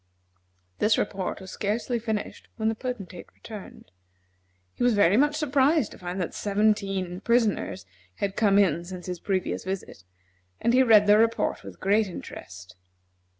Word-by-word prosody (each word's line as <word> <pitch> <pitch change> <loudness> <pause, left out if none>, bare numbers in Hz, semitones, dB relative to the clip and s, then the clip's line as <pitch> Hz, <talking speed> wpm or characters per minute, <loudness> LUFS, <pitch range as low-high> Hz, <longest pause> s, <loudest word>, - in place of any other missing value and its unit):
This 215 +1 +3
report 195 -2 -2
was 190 - -9
scarcely 230 +4 -2
finished 220 -2 -4
when 220 -1 0
the - - 0
Potentate 215 -7 -6
returned. 205 - -11 0.8
He - - -12
was 245 -2 +4
very 200 -2 +4
much 295 +5 +3
surprised 290 -2 +2
to - - -13
find 180 +1 -5
that 180 - -3
seventeen 195 -3 0
prisoners 220 - +1 0.3
had 200 -1 -3
come 200 -3 +3
in 170 -5 +3
since 180 0 -8
his 180 -2 -5
previous 190 -1 -2
visit, 190 - -6 0.6
and 235 - +1
he 255 - +6
read 220 -5 +6
the 205 +1 +6
report 230 0 +1
with - - -10
interest. 180 - -2
205 Hz, 150 wpm, -26 LUFS, 185-230 Hz, 0.8 s, he